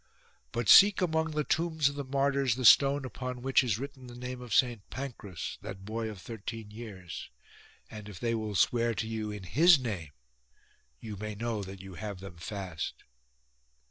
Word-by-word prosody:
But 120 Hz, -2 st, -2 dB
seek 200 Hz, 0 st, +9 dB
among 160 Hz, -2 st, +1 dB
the 150 Hz, -1 st, -1 dB
tombs 160 Hz, -2 st, +1 dB
of 140 Hz, -, -1 dB
the 140 Hz, 0 st, -4 dB
martyrs 135 Hz, -2 st, +1 dB
the 130 Hz, -1 st, -3 dB
stone 140 Hz, +3 st, +7 dB
upon 125 Hz, 0 st, -6 dB
which 135 Hz, 0 st, +4 dB
is 115 Hz, -5 st, 0 dB
written 135 Hz, 0 st, -8 dB
the 120 Hz, -, -10 dB
name 125 Hz, 0 st, -6 dB
of 125 Hz, -2 st, -9 dB
St 120 Hz, -1 st, +3 dB
Pancras, 115 Hz, -10 st, -6 dB
that 95 Hz, 0 st, -8 dB
boy 110 Hz, +1 st, -3 dB
of 105 Hz, -3 st, -8 dB
thirteen 110 Hz, +1 st, -7 dB
years; 100 Hz, -6 st, -8 dB, 0.6 s
and 105 Hz, -1 st, -9 dB
if 95 Hz, -, -9 dB
they 115 Hz, -1 st, 0 dB
will 110 Hz, -2 st, -3 dB
swear 115 Hz, +4 st, +2 dB
to 110 Hz, +3 st, -2 dB
you 110 Hz, -1 st, -3 dB
in 105 Hz, -2 st, -6 dB
his 155 Hz, -, +6 dB
name 105 Hz, -, -4 dB, 0.9 s
you 105 Hz, +2 st, -7 dB
may 105 Hz, +1 st, -5 dB
know 115 Hz, 0 st, -2 dB
that 95 Hz, -1 st, -8 dB
you 95 Hz, 0 st, -10 dB
have 100 Hz, 0 st, -6 dB
them 95 Hz, -2 st, -10 dB
fast." 90 Hz, -3 st, -5 dB
115 Hz, 180 wpm, -30 LUFS, 105-135 Hz, 0.9 s, seek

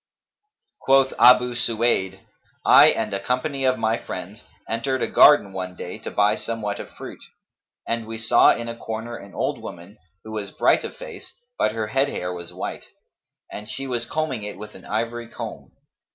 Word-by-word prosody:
Quoth 135 Hz, 0 st, +3 dB
Abu 125 Hz, 0 st, +7 dB
Suwayd, 115 Hz, -5 st, 0 dB, 0.4 s
"I -, -, +8 dB
and 110 Hz, -2 st, +1 dB
a 100 Hz, -, 0 dB
company 135 Hz, +5 st, -2 dB
of 130 Hz, 0 st, +2 dB
my 110 Hz, +1 st, 0 dB
friends, 95 Hz, +4 st, -8 dB, 0.2 s
entered 125 Hz, +3 st, -1 dB
a -, -, 0 dB
garden 145 Hz, -10 st, +6 dB
one 90 Hz, -1 st, -5 dB
day 90 Hz, -, -7 dB
to -, -, -6 dB
buy 105 Hz, +1 st, +3 dB
somewhat 110 Hz, -2 st, -4 dB
of -, -, -8 dB
fruit; -, -, -10 dB, 0.7 s
and 115 Hz, -1 st, -2 dB
we 115 Hz, 0 st, -5 dB
saw 115 Hz, +2 st, +5 dB
in 115 Hz, -, -3 dB
a 115 Hz, -, -5 dB
corner 115 Hz, +1 st, -6 dB
an 100 Hz, -3 st, -12 dB
old -, -, -2 dB
woman, 90 Hz, +6 st, -10 dB, 0.2 s
who 110 Hz, -, -9 dB
was 105 Hz, -2 st, -4 dB
bright -, -, +2 dB
of -, -, -7 dB
face, -, -, -10 dB, 0.2 s
but 110 Hz, -, +1 dB
her 110 Hz, -1 st, -2 dB
head 135 Hz, +4 st, +1 dB
hair 90 Hz, -7 st, -4 dB
was 85 Hz, -1 st, -8 dB
white, -, -, -6 dB, 0.7 s
and 105 Hz, +1 st, -8 dB
she 135 Hz, +4 st, -5 dB
was 120 Hz, -3 st, -2 dB
combing 155 Hz, -7 st, -2 dB
it 105 Hz, 0 st, -7 dB
with 105 Hz, +1 st, -10 dB
an -, -, -13 dB
ivory 115 Hz, +2 st, -3 dB
comb. 115 Hz, -, -8 dB
115 Hz, 180 wpm, -23 LUFS, 105-125 Hz, 0.7 s, I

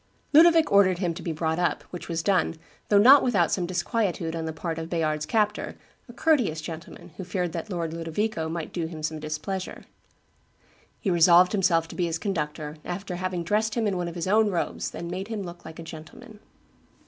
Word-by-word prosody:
Ludovic 325 Hz, +1 st, +6 dB
ordered 195 Hz, -3 st, +5 dB
him 175 Hz, -2 st, -1 dB
to -, -, -8 dB
be 170 Hz, -, -3 dB
brought 160 Hz, +1 st, -1 dB
up, 175 Hz, -, 0 dB
which 175 Hz, -, -8 dB
was 165 Hz, -1 st, -2 dB
done, 185 Hz, -4 st, +2 dB, 0.3 s
though 205 Hz, -, +5 dB
not 260 Hz, +7 st, +8 dB
without 200 Hz, -9 st, +2 dB
some 180 Hz, -2 st, 0 dB
disquietude 180 Hz, -2 st, -1 dB
on 165 Hz, -1 st, -3 dB
the 160 Hz, -, -3 dB
part 165 Hz, 0 st, -4 dB
of 160 Hz, 0 st, -6 dB
Bayard's 155 Hz, -3 st, -1 dB
captor, 210 Hz, -1 st, 0 dB, 0.3 s
"a -, -, -10 dB
courteous 245 Hz, -, +2 dB
gentleman, 165 Hz, +2 st, -9 dB
who 190 Hz, -, -5 dB
feared 180 Hz, -1 st, -2 dB
that 170 Hz, +6 st, -5 dB
Lord 170 Hz, -4 st, -3 dB
Ludovico 165 Hz, +1 st, -2 dB
might 165 Hz, -1 st, -5 dB
do 170 Hz, -2 st, -2 dB
him 160 Hz, -2 st, -8 dB
some 155 Hz, 0 st, -2 dB
displeasure." 155 Hz, +5 st, -5 dB, 1.2 s
He 195 Hz, -, -1 dB
resolved 175 Hz, +1 st, +6 dB
himself 175 Hz, -5 st, +2 dB
to -, -, -9 dB
be 180 Hz, -, 0 dB
his 165 Hz, 0 st, -2 dB
conductor, 155 Hz, -5 st, -3 dB
after 180 Hz, 0 st, -5 dB
having 185 Hz, -1 st, -2 dB
dressed 210 Hz, +4 st, 0 dB
him 230 Hz, -2 st, 0 dB
in 200 Hz, -2 st, 0 dB
one 175 Hz, -1 st, -2 dB
of 170 Hz, -, -7 dB
his 170 Hz, -, -3 dB
own 215 Hz, +2 st, +4 dB
robes 180 Hz, -4 st, -3 dB
and 170 Hz, 0 st, -5 dB
made 190 Hz, +2 st, -4 dB
him 220 Hz, -3 st, -4 dB
look 175 Hz, -1 st, -10 dB
like 160 Hz, 0 st, -9 dB
a 165 Hz, -, -7 dB
gentleman. 210 Hz, +9 st, -11 dB
175 Hz, 205 wpm, -26 LUFS, 165-200 Hz, 1.2 s, not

